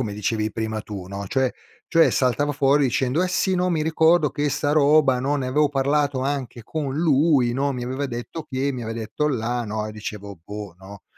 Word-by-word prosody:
come 110 -5 -2
dicevi 110 +1 -2
prima 110 -1 -3
tu, 100 -4 -7
no, 100 +1 -6
cioè 130 -1 +1 0.4
cioè 165 -1 +4
saltava 140 +3 +1
fuori 140 +1 +3
dicendo: 130 +5 +1
"Eh 185 - 0
sì, 190 +1 +1
no, 180 0 +1
mi 160 -3 0
ricordo 160 0 +3
che 145 -1 -1
'sta 145 +2 0
roba, 145 -3 +4
no, 140 +3 0
ne 135 -3 -2
avevo 145 +3 +2
parlato 140 0 +1
anche 135 -3 -3
con 140 +1 -4
lui, 145 -5 +3
no, 140 +2 0
mi 125 -2 -4
aveva 130 +3 -3
detto 130 +5 -5
che, 135 +1 -2
mi 125 -3 -5
aveva 115 0 -5
detto 115 +7 -2
là" 120 -2 -1
no. 105 0 -3
E 110 - -7
dicevo: 105 -2 -7
"Boh", 105 -3 -7
no. 100 +1 -12
130 Hz, 210 wpm, -23 LUFS, 110-145 Hz, 0.4 s, cioè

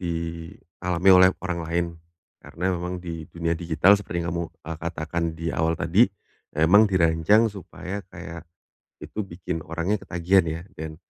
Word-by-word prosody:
dialami 85 +1 -2
oleh 90 0 +8 0.2
orang 90 -1 -2
lain. 85 +1 -1 0.5
Karena 95 +3 -2
memang 90 +1 -3
di 80 -2 -6
dunia 85 -1 -2
digital 85 +2 +3
seperti 85 -4 -4
yang 85 - -2
kamu, 85 0 -1 0.2
eee, 80 +1 -5
katakan 85 0 -3
di 85 -1 -3
awal 80 0 +1
tadi, 95 +9 +4 0.5
ya 80 - +4
emang 100 +6 +6
dirancang 95 +5 +3
supaya 100 0 -7
kayak, 85 -2 -9 0.5
itu - - -7
bikin 85 -2 -5
orangnya 85 +6 -1
ketagihan 90 +2 +2
ya, 80 +1 -3 0.2
dan 80 0 -6
85 Hz, 150 wpm, -25 LUFS, 80-90 Hz, 0.5 s, oleh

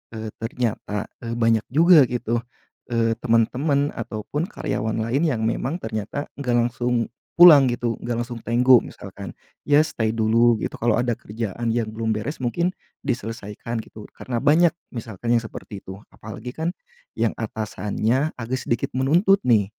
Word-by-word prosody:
eee, 110 -1 -5
ternyata, 115 -3 -3
eee, 115 0 -5
banyak 115 -2 +2
juga 160 0 +6
gitu, 120 -1 -1 0.5
eee, 115 -1 +1
temen-temen 135 +6 +1
ataupun 115 - -4
karyawan 110 - -3
lain 130 +8 0
yang 115 -7 -1
memang 135 +9 -2
ternyata 110 +6 -4
nggak 125 -3 0
langsung 120 0 0 0.2
pulang 160 -6 +9
gitu, 120 -2 -1
nggak 120 0 -3
langsung 120 0 -6
tenggo 125 +2 +6
misalkan. 100 -2 -7 0.3
Ya 145 +1 +5
stay 110 -8 -1
dulu 115 +1 +4
gitu, - - -4
kalau 120 -1 +2
ada 120 -1 0
kerjaan 115 +1 -3
yang 115 -2 -1
belum 110 0 -2
beres 110 +9 -4
mungkin 130 +8 0 0.3
diselesaikan 115 0 -4
gitu, 105 -1 -12
karena 120 -2 -4
banyak 160 +7 +4 0.2
misalkan 115 0 -3
yang 115 - +3
seperti 105 -2 -9
itu. 95 +1 -9 0.2
Apalagi 110 +3 -8
kan 160 +3 -2 0.5
yang - - +1
atasannya 110 +5 -2
agak 125 +2 -3
sedikit 120 - -2
menuntut 170 +10 +3
nih, 110 -5 +3
120 Hz, 150 wpm, -23 LUFS, 110-130 Hz, 0.5 s, pulang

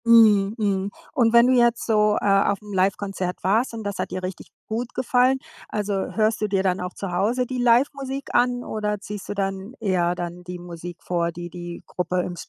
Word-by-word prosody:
Mhm, 215 -3 +6
mhm. 200 -3 0 0.2
Und 230 -3 +3
wenn 235 0 +7
du 260 - +4
jetzt 240 -1 +3
so, 210 -2 +3
äh, - - -4
auf'm 200 +1 +2
Livekonzert 190 -1 -1
warst 220 +7 +2
und 225 - -6
das 200 -2 -4
hat - - -2
dir 185 - -4
richtig 185 0 -6 0.2
gut 235 +2 -4
gefallen, 255 +1 +3 0.3
also 210 -1 -2 0.2
hörst 215 0 +2
du 215 - +1
dir 195 -2 +1
dann 185 -1 +1
auch 180 0 -4
zu 195 -2 -5
Hause 225 +8 +1
die 255 +1 -4
Livemusik 270 +3 +1
an 245 0 +2
oder 210 -1 -2
ziehst 205 0 -7
du - - -1
dann 195 +2 -3
eher 180 -5 +1
dann 175 0 -6
die 180 0 -6
Musik 175 0 -8
vor, 170 -1 0
die 175 +1 -7
die 175 0 -7
Gruppe 180 0 -1
im 175 - -5
205 Hz, 200 wpm, -24 LUFS, 185-230 Hz, 0.3 s, wenn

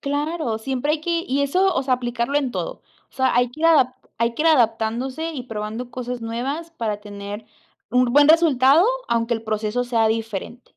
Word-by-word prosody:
Claro, 290 -4 -2
siempre 265 +5 -1
hay 310 - -1
que 335 +1 -1
y 275 +2 0
eso, 370 +7 +2
o - - 0
sea, 260 -1 +2
aplicarlo 240 +2 -2
en 270 -3 -2
todo. - - -5 0.3
O - - -37
sea, 260 -2 +1
hay 245 0 +2
que 310 +5 -13
ir 330 - +4
adapt 260 -6 +4 0.2
hay 235 0 0
que 305 - -2
ir 325 - +4
adaptándose 250 +4 +1
y 255 -5 -6
probando 225 +2 -5
cosas 250 -1 -5
nuevas, 265 +9 -4
para 215 -7 -3
tener 205 +1 -8 0.4
un 250 +1 +4
buen 290 +1 +6
resultado, 310 -1 +5 0.2
aunque 230 0 0
el 225 - -1
proceso 215 +2 -1
sea 230 -2 +2
diferente. 225 +2 -4
250 Hz, 195 wpm, -22 LUFS, 230-290 Hz, 0.4 s, buen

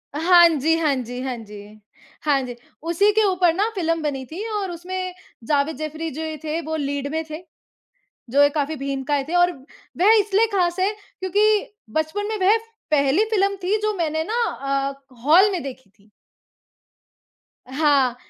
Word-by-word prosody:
हाँ 345 +2 +7
जी, 320 +1 +1
हाँ 300 -4 +1
जी। 245 0 -5
हाँ 260 -2 -3
जी, 210 -2 -10 0.6
हाँ 285 -3 +2
जी। 245 -1 -6 0.3
उसी 345 +5 +3
के 440 0 +3
ऊपर 360 -3 +3
ना 410 +5 +1
फ़िल्म 330 -2 0
बनी 270 -3 -3
थी 370 +7 -5 0.2
और 385 -3 -3
उसमें 365 +2 -5 0.3
जावेद 295 +1 +1
जाफ़री 310 +1 -4
जो 310 +4 -6 0.2
थे 315 +2 -2
वो 315 0 -4
लीड 285 -1 -2
में 320 0 -1
थे। 310 +1 -6 0.9
जो 280 +3 +4
ये 285 - +6
काफ़ी 300 +1 -2
भीमकाय 275 0 -2
थे 325 +5 -5
और 350 0 +4 0.5
वह 405 +5 +6
इसलिए 420 +2 +2
ख़ास 355 -2 +1
है 385 - +2 0.3
क्योंकि 415 +3 +1 0.2
बचपन 315 +7 -1
में 440 - -2
वह 425 - +6 0.3
पहली 290 +6 +3
फ़िल्म 395 -1 +1
थी 400 +4 +2
जो 430 - +1
मैंने 315 -2 -1
ना 480 - +1 0.5
अ, - - -8 0.3
हॉल 365 +8 +6
में 355 - -2
देखी 260 -5 -9
थी। 205 +1 -28 1.6
हाँ, 275 -3 +2
320 Hz, 165 wpm, -22 LUFS, 280-370 Hz, 1.6 s, हाँ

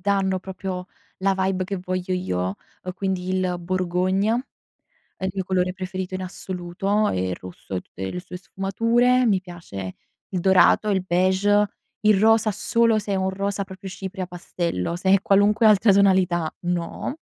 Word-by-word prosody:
danno 195 -1 +1
proprio 185 -1 -5 0.3
la 195 +1 +2
vibe 190 -1 0
che 195 0 -4
voglio 185 0 -3
io, 95 - -1 0.3
ehm, 185 - -4
quindi 190 -1 -2
il 185 -1 0
borgogna, 185 +4 0 0.8
è 190 - -6
il 190 - 0
mio 190 -1 -2
colore 185 -1 0
preferito 185 0 -5
in 185 - -3
assoluto 185 +3 -2
e 95 0 -1
il 90 - -3
rosso 90 +1 -7
e - - -1
tutte 95 +1 -7
le 180 - -4
sue 180 0 -9
sfumature. 230 +7 +1
Mi 200 -4 +3
piace 165 - -8 0.3
il 185 - -2
dorato, 190 +3 +5
il 190 -2 +1
beige, 190 +3 +3 0.3
il 210 -2 +4
rosa 225 0 +4
solo 225 +2 +2
se 205 -1 -3
è - - +1
un 190 0 0
rosa 200 +1 -2
proprio 190 0 -9
cipria 190 0 -5
pastello, 170 - -3
se 190 +2 0
è 195 - +2
qualunque 205 +3 +4
altra 210 0 +6
tonalità 185 -4 +3
no. 175 - -3
190 Hz, 165 wpm, -23 LUFS, 180-200 Hz, 0.8 s, altra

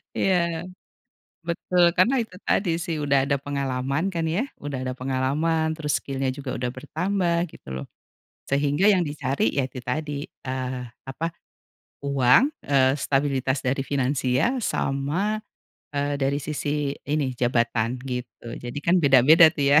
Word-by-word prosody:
Iya, 190 -1 +2 1.1
betul. 175 +1 +1
Karena 225 +10 +4
itu 220 - -11
tadi 190 -4 +2
sih, 165 -2 -2
udah 140 -1 +3
ada 140 - +2
pengalaman 140 +2 -1
kan 165 -1 -1
ya, 205 - +1 0.2
udah 140 -3 -3
ada 130 0 -2
pengalaman, 140 +5 0
terus 150 -2 -2
skill-nya 135 -1 -2
juga 135 0 -6
sudah 125 0 -2
bertambah 175 +5 -1 0.2
gitu - - -16
loh. 65 - -5 0.7
Sehingga 145 +6 +2
yang 185 - +2
dicari, 145 -3 -2
ya 135 - +3
itu 130 0 -8
tadi 150 +5 -3 0.3
eee, 130 -1 -3 0.3
apa, 160 +5 -3 0.8
uang, 130 - +5 0.2
eee, 135 -1 +3
stabilitas 135 -1 0
dari 135 +1 +1
finansial, 135 - +1
sama, 175 +13 -1 0.5
eee, 145 0 0
dari 135 +1 +1
sisi 145 -1 -1 0.2
ini, 145 -3 0
jabatan 120 -1 +1
gitu. 125 -2 -6 0.2
Jadi 120 +3 -5
kan 170 - +4
beda-beda 145 +4 +7
tuh 150 -3 -2
ya. 150 - +8
140 Hz, 140 wpm, -24 LUFS, 130-160 Hz, 1.1 s, ya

